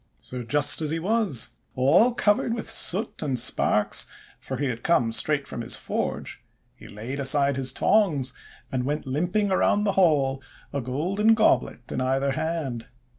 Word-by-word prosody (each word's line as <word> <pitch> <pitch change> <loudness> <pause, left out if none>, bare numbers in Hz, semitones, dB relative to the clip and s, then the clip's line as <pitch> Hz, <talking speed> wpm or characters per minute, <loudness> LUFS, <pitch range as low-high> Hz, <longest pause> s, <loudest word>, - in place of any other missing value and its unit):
So 125 -1 -6
just 145 +6 +3
as 155 - 0
he 160 - -1
was, 185 - +2 0.2
all 170 - +3
covered 215 +2 +1
with 230 - -6
soot 225 -1 +1
and 135 -4 -2
sparks, 110 -3 +1 0.3
for 130 - -6
he 140 - -2
had 120 -3 -4
come 125 -9 +1
straight 145 +4 +2
from - - -6
his 115 - -1
forge, - - -4 0.3
he - - -15
laid 115 +7 -7
aside 140 0 +2
his 130 -1 0
tongs, 150 -7 +1 0.4
and 130 -1 -2
went 150 +3 -3
limping 180 +10 -1
around 205 +2 +2
the 205 - +1
hall, 135 -6 +2 0.3
a 140 - -2
golden 185 - +1
goblet 215 - 0
in - - -3
either 135 +2 0
hand. 150 -6 -4
140 Hz, 165 wpm, -24 LUFS, 130-185 Hz, 0.4 s, just